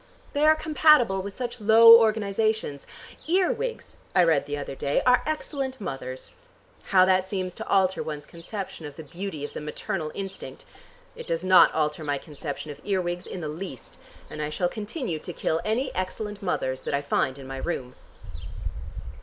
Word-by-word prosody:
They 295 +2 +3
are 310 - +7
compatible 305 -10 +4
with 200 +1 -8
such 245 -2 -5
low 230 +2 +9
organizations. 215 -7 0 0.4
Earwigs, 440 +8 0 0.2
I 180 - +6
read 160 -4 +2
the 145 0 -3
other 140 -1 -5
day, 140 +1 0
are 250 0 +5
excellent 275 -4 -3
mothers. 135 -8 -6 0.5
How 185 -2 +5
that 185 0 +3
seems 185 -1 -3
to - - -8
alter 190 -1 +2
one's 150 -2 -5
conception 170 -1 -7
of 145 - -11
the 160 - -8
beauty 160 0 -5
of - - -9
the - - -5
maternal 155 +1 -4
instinct! 195 - -7 0.5
It - - -9
does 165 0 -1
not 185 0 +7
alter 155 0 0
my 145 -1 -1
conception 150 0 -7
of 145 0 -11
earwigs 180 -3 -2
in 180 - -6
the 155 - -3
least, 150 -5 -8 0.3
and 150 - -7
I 150 - -2
shall 175 +4 0
continue 215 - -4
to 175 - -7
kill 160 0 -1
any 240 +5 -1
excellent 205 +2 -4
mothers 130 -8 -1
that - - -2
I 140 - -1
find 135 -1 0
in 135 - -10
my 135 0 -6
room." 130 -4 -4
185 Hz, 175 wpm, -26 LUFS, 150-220 Hz, 0.5 s, low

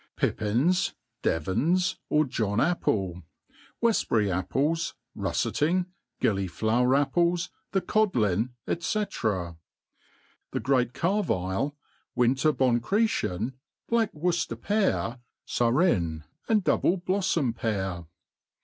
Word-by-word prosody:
Pippins, 135 - +1 0.3
devans, 160 - +1
or 150 0 +3
John 110 -5 -1
apple, 95 - 0 0.6
Weftbury 115 - +2
apples, 145 - 0 0.2
rufTeting, 175 +5 0 0.3
gilliflower 110 +6 +1
apples, 170 +4 +1 0.2
the 195 - +1
codlin, 120 - +1 0.2
he. - - 0
The 110 - -2 1.0
great 125 -2 +1
karvile, 145 - 0 0.4
winter 130 +5 +3
bonchretien, 125 - +1 0.3
black 230 -3 +2
Worcefter 165 -7 -1
pear, 195 - 0 0.3
furrein, 115 - +1 0.3
and 215 -3 +3
double 185 0 +2
blpfTompear. 115 - -1
130 Hz, 80 wpm, -27 LUFS, -, 1.0 s, or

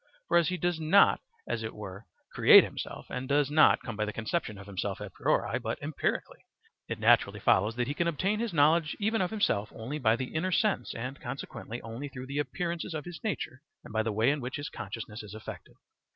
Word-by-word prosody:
For - - +4
as 170 -2 +4
he 180 - -2
does 175 -2 0
not 160 +6 +5 0.3
as 115 - -2
it 110 0 -5
were 100 0 -8 0.3
create - - +9
himself, - - -6
and 130 +1 -4
does 145 0 +2
not 155 0 +5
come 115 - -5
by 105 - -1
the 105 - -3
conception 110 +1 -2
of 100 - -10
himself 100 -2 -3
a - - -7
priori - - 0
but - - -3
empirically, - - -2 0.5
it - - -2
naturally - - +4
follows 105 +4 +3
that 125 0 0
he 140 - -2
can 170 +3 0
obtain 190 +6 0
his 230 -2 -1
knowledge 160 +1 +3
even 220 +1 +1
of 180 - +1
himself 110 - 0
only 130 +7 -5
by 115 -4 +4
the 130 +1 -5
inner 175 +4 0
sense 190 - +1
and, 130 +4 -5
consequently, 120 -3 -6
only 115 +6 -6
through 130 -1 -8
the 140 +2 -3
appearances 170 +2 -3
of 150 - -4
his 175 -1 -9
nature 160 - -3 0.2
and - - -11
the 110 - -1
way 110 +6 +3
in 145 -1 -2
which 125 +2 -4
his 145 0 -4
consciousness 110 0 -7
is 105 -1 -10
affected. 110 - -9
140 Hz, 215 wpm, -30 LUFS, 115-170 Hz, 0.5 s, create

